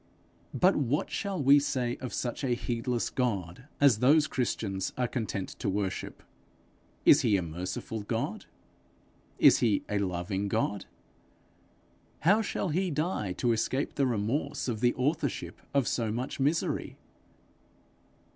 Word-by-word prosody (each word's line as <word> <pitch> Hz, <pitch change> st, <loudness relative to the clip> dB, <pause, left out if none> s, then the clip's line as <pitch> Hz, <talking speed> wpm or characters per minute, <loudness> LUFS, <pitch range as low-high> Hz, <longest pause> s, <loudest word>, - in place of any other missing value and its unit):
But 185 Hz, +2 st, +4 dB
what 145 Hz, +1 st, 0 dB
shall 200 Hz, -3 st, -2 dB
we 140 Hz, +2 st, +7 dB
say 130 Hz, -4 st, -1 dB
of 130 Hz, -, -6 dB
such 120 Hz, +3 st, -3 dB
a 125 Hz, -3 st, +1 dB
heedless 120 Hz, 0 st, -2 dB
God 105 Hz, -4 st, -2 dB
as 135 Hz, -7 st, +5 dB
those 150 Hz, +5 st, +5 dB
Christians 100 Hz, -8 st, -2 dB
are 125 Hz, -1 st, +1 dB
content 110 Hz, -5 st, -3 dB
to -, -, -1 dB
worship! 95 Hz, -1 st, -3 dB, 0.8 s
Is -, -, +7 dB
he 100 Hz, -, +3 dB
a 90 Hz, -, -2 dB
merciful 90 Hz, +6 st, -5 dB
God? 100 Hz, -, -3 dB, 0.9 s
Is -, -, +6 dB
he 110 Hz, -5 st, +2 dB
a 105 Hz, -1 st, 0 dB
loving 95 Hz, +1 st, -2 dB
God? 100 Hz, 0 st, -1 dB, 1.3 s
How 200 Hz, +7 st, +4 dB
shall 200 Hz, -3 st, -2 dB
he 180 Hz, +4 st, 0 dB
die 150 Hz, -, -1 dB
to 120 Hz, +6 st, 0 dB
escape 130 Hz, +5 st, -1 dB
the 140 Hz, -2 st, +1 dB
remorse 125 Hz, +7 st, -1 dB
of 115 Hz, -4 st, -2 dB
the 120 Hz, +1 st, +2 dB
authorship 130 Hz, -, -2 dB
of 140 Hz, -3 st, +1 dB
so 115 Hz, -3 st, 0 dB
much 125 Hz, +5 st, -4 dB
misery? 150 Hz, +5 st, 0 dB
120 Hz, 135 wpm, -29 LUFS, 100-140 Hz, 1.3 s, we